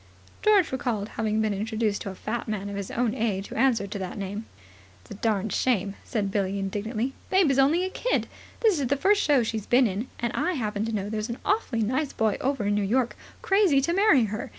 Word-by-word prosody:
George 410 -5 +4
recalled 230 -5 -2
having 220 -1 -1
been 215 -1 0
introduced 215 +1 -1
to - - -4
a 190 - -7
fat 220 +5 -4
man 205 -2 -3
of 200 - -5
his 200 -1 -4
own 235 -2 0
age 205 -3 -2
who - - -8
answered 225 -5 +2
to 205 - -4
that 185 +1 -5
name. 205 +2 -5 0.5
"It's - - -20
a - - -4
darned 210 0 -1
shame," 200 -6 +1
said 205 -4 -2
Billie 195 -1 0
indignantly. 215 +6 -2 0.2
"Babe 375 -6 +4
is 270 - +2
only 315 +7 +4
a 375 - -4
kid. - - 0 0.4
This 425 -9 +3
is 270 - 0
the 280 +3 +1
first 405 +6 +3
show 280 -5 +3
she's 220 -2 -3
been 250 +1 +5
in. 210 +3 -2
And 235 -1 -2
I 365 - 0
happen 215 -6 -2
to 225 - -3
know 205 -2 -2
there's 215 +2 -3
an 235 - -4
awfully 330 - +1
nice 260 +6 -1
boy 220 -2 +1
over 270 -5 0
in 205 - +1
New 205 - +1
York 235 +5 +1 0.3
crazy 385 -8 +4
to 340 +5 0
marry 370 - +5
her. 215 0 -4
225 Hz, 230 wpm, -26 LUFS, 205-270 Hz, 0.5 s, been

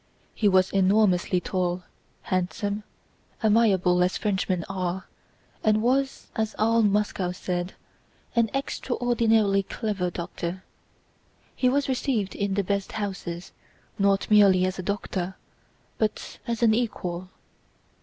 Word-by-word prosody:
He 215 - +1
was 185 -1 +3
enormously 190 -2 +3
tall, 180 -1 -2 0.4
handsome, 200 +3 -1 0.6
amiable 200 -5 +4
as 180 - 0
Frenchmen 190 -4 -1
are, 185 -1 -3 0.6
and 215 0 +4
was, 265 +2 +1
as 220 -1 -1
all 225 +2 +3
Moscow 205 -3 +1
said, 180 0 -3 0.6
an 230 -1 +3
extraordinarily 230 -6 +1
clever 195 -2 -2
doctor. 175 +1 -5 0.9
He 255 - +2
was 280 +2 +1
received 250 -6 -1
in 200 -1 -1
the 200 - +1
best 200 +1 -2
houses 190 -4 -4 0.5
not 200 0 +3
merely 195 -3 +6
as 185 0 -3
a - - -1
doctor, 190 -1 -3 0.6
but 215 -1 -2
as 235 0 -1
an 220 -2 +5
equal. 185 -6 -2
200 Hz, 115 wpm, -26 LUFS, 185-220 Hz, 0.9 s, merely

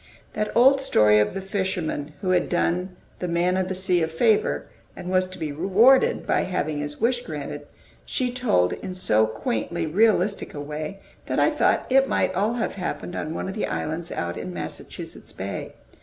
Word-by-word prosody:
That 210 0 -2
old 270 +3 +6
story 105 - +4
of 105 - +1
the 195 - -3
fisherman 185 -6 -2
who 185 - 0
had 180 - +2
done 180 +1 0 0.2
the 180 - -2
"Man 175 +2 +1
of 185 -1 0
the 190 - -3
Sea" 180 -1 +1
a 160 - +2
favor, 160 - +2 0.3
and 180 - -6
was 185 0 +2
to 185 - -10
be 155 -3 -3
rewarded 195 - +4
by - - +2
having 155 -5 -2
his 145 0 -5
wish 245 +2 +1
granted, 145 -1 -6 0.4
she 250 -1 -1
told 240 - +2
in 185 -1 -6
so 110 -12 +3
quaintly 115 +9 -2
realistic 200 +3 +2
a - - -5
way 150 +6 -5 0.3
that - - -1
I - - +4
thought - - +2
it 270 +1 +4
might - - +1
all 205 +5 +1
have 240 -2 -2
happened 180 0 -4
on 155 +2 -4
one - - -3
of 190 - -4
the 210 - -2
islands 165 +2 -3
out 85 0 -3
in 90 - -5
Massachusetts 85 -2 -8
Bay. - - -5
180 Hz, 190 wpm, -24 LUFS, 150-200 Hz, 0.4 s, old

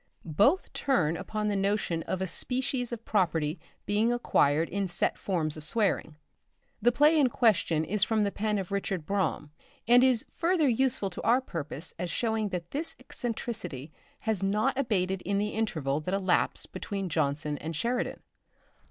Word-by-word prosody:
Both 205 - +2
turn 180 - +1
upon 215 +5 -3
the 205 - 0
notion 195 -4 0
of 190 0 -1
a - - 0
species 250 - -1
of 230 -1 -6
property 165 -6 +1 0.3
being 210 +4 +2
acquired 165 -10 +2
in 200 0 -2
set 175 - 0
forms 160 -6 -1
of 155 - -9
swearing. 200 -4 +1 0.7
The 240 +3 +5
play 300 +5 +5
in 270 -3 +4
question 185 -10 +2
is 200 +3 0
from 220 0 +2
the 200 - 0
pen 210 +1 -1
of 190 -2 -4
Richard 195 -4 -2
Brome, 190 -5 -1 0.4
and 245 +1 +7
is 255 -3 +3
further 335 -3 +2
useful 240 -5 +1
to - - -6
our 240 +3 +4
purpose 165 - -5
as 180 - -2
showing 220 +1 0
that 175 -2 -5
this 310 +4 -2
eccentricity 185 - -4 0.3
had 220 -3 -1
not 210 +7 +1
abated 195 -8 0
in 200 +2 -1
the 210 +1 0
interval 155 -11 -1
that 180 +5 -2
elapsed 190 -2 0
between 195 +1 -4
Jonson 145 -2 -1
and 160 +1 -5
Sheridan. 240 +10 -2
200 Hz, 165 wpm, -29 LUFS, 170-235 Hz, 0.7 s, and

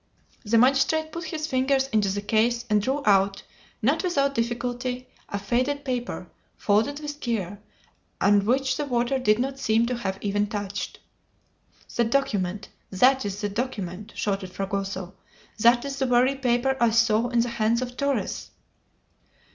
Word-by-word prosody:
The 230 +1 +2
magistrate 275 +6 +3
put 335 +1 -6
his 315 -1 -3
fingers 265 -1 +1
into 215 -4 +2
the 200 +1 -2
case 235 +3 +1
and 210 -1 +4
drew 270 +6 -1
out, 195 -1 +3 0.4
not - - +2
without 280 -7 +1
difficulty, 245 +1 -2 0.2
a 200 - -2
faded 255 +8 -1
paper, 250 -2 -3 0.3
folded 220 +8 +1
with 295 -1 -6
care, 205 -6 -3 0.6
and 205 0 +4
which 260 +5 +1
the 295 - -1
water 245 0 0
did 215 -4 +3
not 270 +2 -2
seem 225 -1 +2
to 250 0 -2
have 195 -5 -3
even 205 0 0
touched. 205 -1 -4 1.0
"The 235 - +3
document! 210 -6 -1 0.2
that 255 +6 +3
is 200 +1 -4
the 205 - -1
document!" 205 -4 -4
shouted 195 -3 -2
Fragoso; 195 -1 -4 0.5
"that 240 +3 +5
is 275 -1 -4
the 265 - +1
very 250 +2 +4
paper 265 0 +1
I 235 - +5
saw 230 +1 +3
in 240 -1 +2
the 240 - -1
hands 230 +1 +1
of 245 0 -7
Torres!" 280 +1 -2
235 Hz, 155 wpm, -25 LUFS, 205-265 Hz, 1.0 s, that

